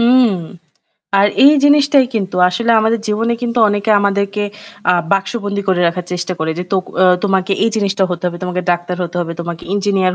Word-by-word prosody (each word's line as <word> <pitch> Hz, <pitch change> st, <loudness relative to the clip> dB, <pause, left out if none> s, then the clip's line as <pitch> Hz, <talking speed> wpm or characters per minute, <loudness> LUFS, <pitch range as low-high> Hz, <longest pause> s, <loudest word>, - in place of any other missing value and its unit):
উম 240 Hz, -2 st, +4 dB, 0.8 s
আর 200 Hz, -, +5 dB, 0.2 s
এই 285 Hz, -, +8 dB
জিনিসটাই 285 Hz, -2 st, +4 dB
কিন্তু 195 Hz, -4 st, -2 dB
আসলে 230 Hz, +6 st, -1 dB
আমাদের 225 Hz, +1 st, 0 dB
জীবনে 225 Hz, +3 st, 0 dB
কিন্তু 240 Hz, 0 st, -2 dB
অনেকে 205 Hz, +1 st, -1 dB
আমাদেরকে 200 Hz, +1 st, -1 dB, 0.5 s
আ -, -, +4 dB, 0.2 s
বাক্সবন্দী 200 Hz, 0 st, -2 dB
করে 185 Hz, -2 st, +2 dB
রাখার 175 Hz, +1 st, -2 dB
চেষ্টা 180 Hz, +1 st, -3 dB
করে 160 Hz, 0 st, -2 dB
যে 180 Hz, -, -3 dB
তোক 190 Hz, -1 st, +1 dB, 0.2 s
আ -, -, +6 dB, 0.2 s
তোমাকে 195 Hz, -1 st, 0 dB
এই 225 Hz, -, +2 dB
জিনিসটা 200 Hz, -2 st, 0 dB
হতে 175 Hz, 0 st, -4 dB
হবে, 175 Hz, -1 st, -3 dB
তোমাকে 180 Hz, 0 st, -3 dB
ডাক্তার 175 Hz, +1 st, -4 dB
হতে 175 Hz, 0 st, -5 dB
হবে, 165 Hz, -1 st, -4 dB
তোমাকে 170 Hz, -1 st, -6 dB
ইঞ্জিনিয়ার 195 Hz, -2 st, 0 dB
200 Hz, 185 wpm, -16 LUFS, 180-220 Hz, 0.8 s, এই